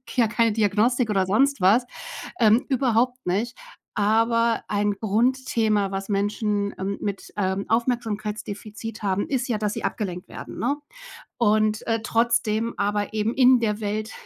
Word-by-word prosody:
ja, 240 -3 +4
keine 230 +1 +2
Diagnostik 220 +3 +2
oder 190 -2 +1
sonst 270 +3 +2
was, 215 +7 +4 0.5
ähm, 220 +1 +4
überhaupt 250 -1 +1
nicht. 210 +7 -1 0.4
Aber 230 +2 +2
ein 205 0 +1
Grundthema, 220 -2 +1
was 195 +1 -4
Menschen, 205 0 0
ähm, 195 +1 -2
mit, 200 -2 -4
ähm, 190 0 -1
Aufmerksamkeitsdefizit 220 -2 -3
haben, 195 0 0
ist 260 -3 -1
ja, 220 - 0
dass 210 -1 -1
sie - - -5
abgelenkt 180 -4 -3
werden, - - -9
ne? 285 - 0 0.6
Und, 215 -1 +2
äh, 225 -1 0
trotzdem 230 0 +1
aber 205 +1 -1
eben 215 +2 0
in 255 -1 +6
der 210 -2 0
Welt 215 +1 -3
215 Hz, 145 wpm, -24 LUFS, 205-235 Hz, 0.6 s, in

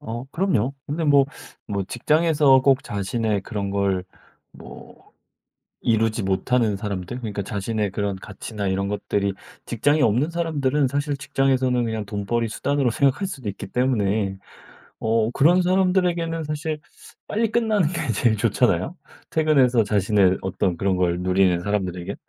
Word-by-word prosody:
어 115 +3 -6
그럼요. 140 - 0
근데 160 +3 -2
뭐 140 -2 +5 0.4
뭐 100 -1 -2
직장에서 150 - +3
꼭 135 -1 +3
자신의 105 +1 -2
그런 100 -2 -4
걸 100 -2 0 0.5
뭐 - - -14 0.7
이루지 110 -1 +1
못하는 105 +3 +1
사람들? 100 +3 -5
그러니까 105 -4 -4
자신의 105 +1 -2
그런 100 0 -2
가치나 105 +1 -6
이런 95 +1 0
것들이 100 -1 -1 0.3
직장이 145 +6 +1
없는 125 +7 +2
사람들은 150 -5 0
사실 145 +2 -1
직장에서는 130 -3 +1
그냥 110 -2 -3
돈벌이 105 +3 -2
수단으로 140 +2 0
생각할 140 - +1
수도 135 - -5
있기 100 - -7
때문에. 105 -5 0 0.7
어 110 0 +1
그런 175 +6 +4
사람들에게는 180 -3 +1
사실 150 +1 -3 0.5
빨리 225 +1 0
끝나는 220 -7 +2
게 155 -8 -2
제일 110 -2 +2
좋잖아요? 110 - +1 0.4
퇴근해서 135 -7 +3
자신의 100 -2 +2
어떤 95 -1 -1
그런 95 +2 0
걸 90 -1 +1
누리는 90 -1 +2
사람들에겐. 95 -1 -3
115 Hz, 335 characters per minute, -23 LUFS, 100-145 Hz, 0.7 s, 뭐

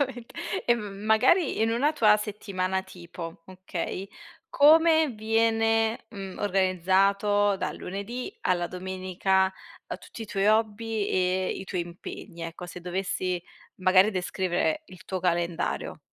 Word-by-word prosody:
Assolutamente 255 -3 -3 0.3
e 240 - +6
m 210 -3 -5 0.2
magari 260 - +4
in 225 - +2
una 275 +7 +2
tua 215 -8 +5
settimana 190 -3 -2
tipo 170 -2 -9
okay? 185 0 -5 0.4
Come 320 +1 +6
viene, 225 0 +1
mhmm, 195 -3 -7
organizzato 195 +1 +2
dal - - -3
lunedì 235 - -5
alla 175 -1 +1
domenica, 190 +1 0 0.3
a - - -5
tutti 230 - -10
i - - -7
tuoi 200 -1 0
hobby 220 0 +1
e 185 0 +1
i 190 - -6
tuoi 185 -2 -3
impegni. 170 -1 -9
Ecco 165 +2 -6
se 175 0 -9
dovessi 180 0 -2 0.3
magari 185 +2 +5
descrivere 190 - -1
il 185 - -14
tuo 190 - -3
calendario? 170 -1 -1
195 Hz, 130 wpm, -27 LUFS, 185-225 Hz, 0.4 s, e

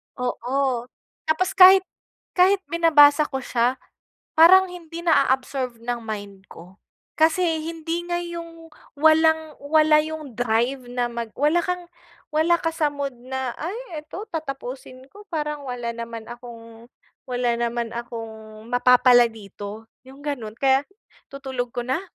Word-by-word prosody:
Oo. 250 0 -2 0.4
Tapos, 315 +4 +1
kahit 380 0 +8 0.5
kahit 380 +2 +4
binabasa 305 -3 +5
ko 265 -1 -4
siya, 245 +1 +1 0.6
parang 375 +3 +7
hindi 340 -2 -9
na-a-absorb 265 -6 +1
ng 240 0 -3
mind 200 -3 -7
ko. 180 +3 -14 0.4
Kasi 325 0 +2
hindi 330 +1 -4
nga 345 - 0
'yong, 335 -1 -8 0.3
walang-wala 315 -1 +3
'yong 310 -4 -7
drive 245 +3 0
na 245 0 -1
mag 235 -1 -5
wala 300 +5 +3
kang 360 0 -3 0.5
wala 325 +3 +3
ka 330 - -1
sa 310 -2 +1
mood 285 -2 -4
na, 255 +1 -5
"Ay! 355 -1 -6
Eto, 340 +7 -8
tatapusin 270 -4 -7
ko. 410 - -13
Parang 300 -3 -3
wala 240 -2 -4
naman 230 -1 -7
akong 235 -1 -12 0.4
wala 245 -1 0
naman 235 -1 -2
akong, 220 -2 -8
mapapala 245 -1 +5
dito." 210 0 -10 0.2
'Yong 270 +2 -14
gano'n. 230 -7 -4
Kaya 270 0 +3 0.5
tutulog 265 -3 -5
ko 245 - -3
na, 260 +7 -1
270 Hz, 130 wpm, -23 LUFS, 240-320 Hz, 0.6 s, kahit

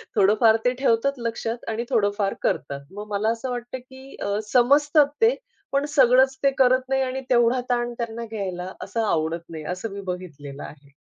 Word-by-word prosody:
थोडंफार 215 +2 +5
ते 250 - +3
ठेवतात 270 +1 +2
लक्षात 230 0 -4
आणि 225 +2 -2
थोडंफार 205 -4 +1
करतात. 140 +1 -1
मग 205 +2 -8
मला 205 +2 +1
असं 230 +3 -2
वाटतं 245 +1 -5
की 265 +1 -13
अ, - - -2 0.2
समजतात 285 +4 +5
ते 460 +2 +5 0.4
पण 280 +1 +2
सगळंच 265 -1 +4
ते 275 - +4
करत 255 0 +3
नाही 270 0 +2
आणि 260 +1 -3
तेवढा 240 0 +3
ताण 240 -1 0
त्यांना 235 0 -4
घ्यायला 190 -4 -5
असं 230 - -3
आवडत 165 -3 -1
नाही, 160 -2 -7
असं 180 +5 -4
मी 200 - -6
बघितलेलं 145 -6 -8
आहे. 140 -1 -13
230 Hz, 175 wpm, -24 LUFS, 200-260 Hz, 0.4 s, थोडंफार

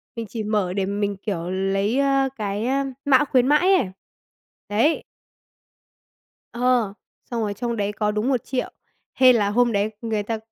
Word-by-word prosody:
mình 230 -1 -4
chỉ 220 +2 -4
mở 210 -4 0
để 195 -1 0
mình 200 0 -2
kiểu 180 -4 -4
lấy, 195 +6 0
ơ, 275 -1 +2
cái, 210 +1 -3
ơ, 275 +1 +1 0.2
mã 285 +1 +5
khuyến 255 -2 +2
mãi 360 +6 +4
ấy. 190 - 0 0.8
Đấy. 235 +10 +2 1.5
Ờ, 245 -4 +1 0.4
xong 235 - -2
rồi 205 -1 -2
trong 235 +2 -3
đấy 205 -1 -1
có 210 +1 -1
đúng 210 +4 -1
1.000.000, 255 0 -1 0.4
hên 255 -2 +6
là 205 -2 +1
hôm 240 +1 +2
đấy 205 +1 +1
người 220 -3 -2
ta 225 +1 -3
225 Hz, 165 wpm, -23 LUFS, 205-255 Hz, 1.5 s, hên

